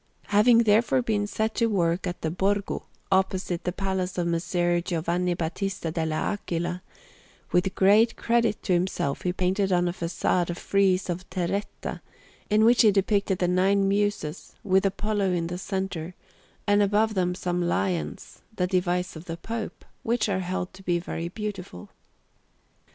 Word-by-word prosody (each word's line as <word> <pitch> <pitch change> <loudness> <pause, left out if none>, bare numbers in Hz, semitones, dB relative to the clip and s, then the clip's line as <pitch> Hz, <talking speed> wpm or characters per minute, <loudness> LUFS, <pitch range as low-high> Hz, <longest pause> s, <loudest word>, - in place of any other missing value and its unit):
Having 230 +3 +5
therefore 225 +4 +3
been 205 -3 0
set 220 +1 -1
to 230 - +2
work 180 -3 0
in 175 - -2
the 160 - -1
Borgo, 200 +3 -1 0.2
opposite 190 -2 +1
to - - -37
the 180 - 0
Palace 190 -1 -2
of 175 - 0
Messer 175 0 +1
Giovanni 175 +1 -1
Battista 175 +1 -3
dall' 160 -1 -1
Aquila, 175 0 -2 0.7
with 180 +2 +1
great 210 +4 +5
credit 235 -2 +1
to 185 - +1
himself 175 -6 0
he 180 - 0
painted 190 +2 0
on 175 -1 +3
a 175 - -1
façade 175 0 0
a 175 - -2
frieze 195 0 +1
in 175 -1 -2
terretta, 190 +2 -3 0.5
in 215 +1 +4
which 235 +1 +6
he 220 - +7
depicted 200 -1 +1
the 180 - +1
Nine 195 +2 +3
Muses, 200 -6 -1
with 190 -1 +3
Apollo 200 -1 0
in 170 -1 0
the 175 +1 -4
centre, 190 -3 -4 0.5
and 205 0 +4
above 210 +2 +2
them 180 -2 0
some 180 -1 -2
lions, 175 0 -2
the 180 - +1
device 180 -1 0
of 160 +2 -9
the 165 -1 -5
Pope, 225 +5 -6 0.2
which 230 -1 0
are 195 -2 0
held 185 0 -3
to 190 - -13
be 175 -2 +1
very 170 -1 -4
beautiful. 190 - -6
185 Hz, 160 wpm, -26 LUFS, 175-205 Hz, 0.7 s, he